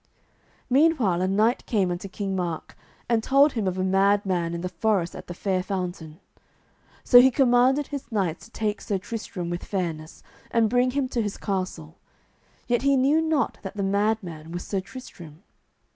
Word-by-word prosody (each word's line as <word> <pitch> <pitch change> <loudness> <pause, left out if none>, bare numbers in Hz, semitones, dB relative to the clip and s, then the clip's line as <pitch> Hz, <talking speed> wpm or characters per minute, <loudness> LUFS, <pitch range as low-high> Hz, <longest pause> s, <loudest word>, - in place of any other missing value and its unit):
Meanwhile 260 - +3
a 185 - +1
knight 215 +5 +2
came 195 -6 +1
unto 175 +3 -5
King 195 0 -3
Mark 175 -3 -4 0.3
and 235 -1 +2
told 275 +5 +4
him 220 -5 -1
of 185 0 -2
a 185 - 0
mad 195 +2 +3
man 170 -3 -1
in 170 - -4
the 180 - -3
forest 195 -5 0
at - - -9
the 175 - -7
fair 185 0 -1
fountain. 180 -5 -5 0.8
So 245 -1 +8
he 260 - +6
commanded 260 +2 +3
his 280 -4 -6
knights 185 -7 -1
to 230 - -18
take 215 -2 -2
Sir 205 -3 -1
Tristram 195 -3 -5
with 175 - -4
fairness, 165 -5 -4 0.3
and 225 -2 +2
bring 250 +1 +3
him 270 +1 -1
to 240 - -1
his 205 -2 -3
castle, 185 -5 -4 0.7
yet 240 -1 +1
he 275 0 +3
knew 280 +5 +3
not 315 -5 0
that 195 +1 -7
the 200 - -1
mad 205 +3 +1
man 160 -2 -9
was 175 +1 -5
Sir 195 - -2
Tristram. 180 - -11
200 Hz, 185 wpm, -25 LUFS, 180-245 Hz, 0.8 s, So